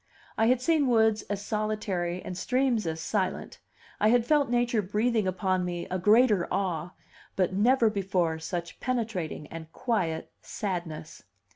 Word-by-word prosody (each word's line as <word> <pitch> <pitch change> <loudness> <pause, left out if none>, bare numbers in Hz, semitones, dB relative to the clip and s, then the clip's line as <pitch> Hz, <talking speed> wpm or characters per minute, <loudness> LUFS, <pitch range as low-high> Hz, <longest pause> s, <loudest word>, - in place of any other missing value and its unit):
I 225 - +2
had 250 +1 +4
seen 300 +1 +2
woods 220 -3 +3
as 205 0 -3
solitary 210 -5 -2
and 180 - -6
streams 245 0 +1
as 160 0 -3
silent, 190 +3 -2 0.4
I 210 - +3
had 235 +1 +4
felt 290 -1 +3
nature 240 -2 +2
breathing 210 +2 0
upon 185 0 0
me 175 -1 -3
a 185 - -1
greater 210 -1 +4
awe; 180 -3 -2 0.4
but 185 -1 +1
never 230 +4 +4
before 185 -5 0
such 170 +1 -5
penetrating 225 - -2
and 160 -1 -8
quiet 175 -10 -2
sadness. 170 -6 -5
200 Hz, 145 wpm, -28 LUFS, 175-230 Hz, 0.4 s, had